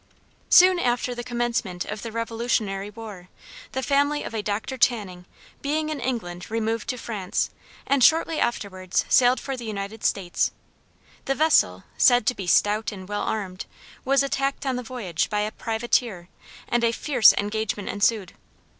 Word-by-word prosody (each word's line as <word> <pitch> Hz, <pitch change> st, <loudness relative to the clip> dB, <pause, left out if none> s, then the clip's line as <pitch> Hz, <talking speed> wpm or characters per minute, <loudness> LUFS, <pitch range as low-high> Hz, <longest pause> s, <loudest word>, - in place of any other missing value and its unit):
Soon 365 Hz, 0 st, +7 dB
after 245 Hz, -2 st, 0 dB
the 240 Hz, 0 st, -6 dB
commencement 235 Hz, -7 st, -2 dB
of 210 Hz, 0 st, -6 dB
the 230 Hz, -, -6 dB
Revolutionary 225 Hz, -3 st, -2 dB
War, 210 Hz, -5 st, -10 dB, 0.4 s
the 265 Hz, -, -2 dB
family 285 Hz, +2 st, +1 dB
of -, -, -7 dB
a 220 Hz, -, -2 dB
Dr. 215 Hz, +6 st, -3 dB
Channing, 200 Hz, -8 st, 0 dB, 0.4 s
being 305 Hz, +2 st, -1 dB
in 305 Hz, -2 st, -3 dB
England, 225 Hz, -9 st, -4 dB
removed 225 Hz, 0 st, -2 dB
to 250 Hz, -, -2 dB
France, 210 Hz, -6 st, -2 dB, 0.3 s
and 275 Hz, -2 st, +2 dB
shortly 320 Hz, +3 st, +4 dB
afterwards 185 Hz, -5 st, -1 dB
sailed 250 Hz, 0 st, +5 dB
for 270 Hz, -, -4 dB
the 245 Hz, -, -8 dB
United 210 Hz, 0 st, -5 dB
States. 180 Hz, -3 st, 0 dB, 0.8 s
The 270 Hz, -, 0 dB
vessel, 265 Hz, -, +3 dB
said 245 Hz, -3 st, +5 dB
to 250 Hz, -, +2 dB
be 195 Hz, -6 st, -7 dB
stout 210 Hz, +5 st, +2 dB
and 190 Hz, -3 st, -9 dB
well 205 Hz, 0 st, -3 dB
armed, 195 Hz, -4 st, -4 dB, 0.4 s
was 275 Hz, 0 st, +3 dB
attacked 275 Hz, 0 st, -1 dB
on 265 Hz, -2 st, 0 dB
the 250 Hz, -, -3 dB
voyage 220 Hz, -9 st, -3 dB
by 210 Hz, 0 st, 0 dB
a 210 Hz, +1 st, -2 dB
privateer, 220 Hz, -6 st, -1 dB, 0.4 s
and 240 Hz, 0 st, +1 dB
a 230 Hz, -, +3 dB
fierce 245 Hz, -1 st, +5 dB
engagement 210 Hz, 0 st, -2 dB
ensued. 205 Hz, -2 st, 0 dB
230 Hz, 160 wpm, -24 LUFS, 205-255 Hz, 0.8 s, Soon